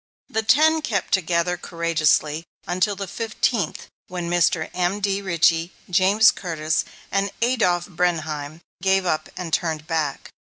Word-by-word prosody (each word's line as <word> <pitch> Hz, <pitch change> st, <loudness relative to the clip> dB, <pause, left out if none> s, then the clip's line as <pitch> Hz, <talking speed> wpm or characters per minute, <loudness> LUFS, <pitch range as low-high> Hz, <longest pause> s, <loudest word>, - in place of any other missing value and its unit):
The 220 Hz, -, 0 dB
ten 310 Hz, +8 st, +4 dB
kept 210 Hz, -9 st, -2 dB
together 180 Hz, -1 st, +1 dB
courageously 165 Hz, -2 st, +1 dB, 0.2 s
until 185 Hz, +3 st, 0 dB
the 200 Hz, +1 st, -4 dB
fifteenth; 220 Hz, -3 st, -2 dB, 0.2 s
then 175 Hz, -1 st, -4 dB
Mr. 175 Hz, -2 st, +2 dB
M.D. 195 Hz, +2 st, 0 dB
Richey, 170 Hz, -2 st, +2 dB, 0.2 s
James 195 Hz, +4 st, +5 dB
Curtis, 160 Hz, -4 st, -2 dB, 0.3 s
and 195 Hz, 0 st, +1 dB
Adolph 220 Hz, -8 st, +2 dB
Brenheim 160 Hz, -4 st, -2 dB, 0.2 s
gave 190 Hz, 0 st, +2 dB
up 155 Hz, -3 st, -1 dB
and 170 Hz, -3 st, -5 dB
turned 160 Hz, -2 st, -1 dB
back. 155 Hz, -4 st, -2 dB
175 Hz, 125 wpm, -23 LUFS, 165-195 Hz, 0.3 s, James